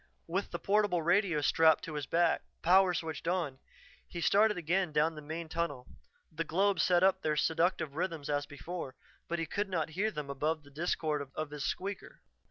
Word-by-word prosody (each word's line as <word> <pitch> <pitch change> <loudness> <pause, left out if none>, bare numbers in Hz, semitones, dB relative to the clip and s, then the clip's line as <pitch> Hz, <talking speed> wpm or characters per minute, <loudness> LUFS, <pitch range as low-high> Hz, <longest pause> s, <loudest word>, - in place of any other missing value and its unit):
With 190 +4 -2
the - - -4
portable 200 -4 +1
radio 175 -2 +2
strapped 160 +2 +4
to 165 - -6
his 145 -2 -4
back, 170 +1 +2 0.2
power 185 +2 +5
switched 160 -1 -4
on, 165 -7 -1 0.5
he 175 - -7
started 210 +4 +4
again 175 +1 0
down 155 +2 +2
the 150 - -9
main 160 +3 -5
tunnel. 160 -6 -3 0.5
The 165 +1 -2
globes 190 +2 +2
set 180 0 +3
up 190 0 +4
their 155 -1 0
seductive 165 -2 +1
rhythms 165 -4 -3
as 145 -1 -1
before, 145 +1 -7 0.3
but 170 - -2
he 165 - -1
could 200 +5 -2
not 165 -4 -1
hear 200 +7 0
them 150 -8 -5
above 150 +3 -1
the 145 - -17
discord 150 -2 -1
of 155 -1 -4
his 145 -2 -4
squeaker. 195 +1 -4
165 Hz, 185 wpm, -32 LUFS, 150-185 Hz, 0.5 s, power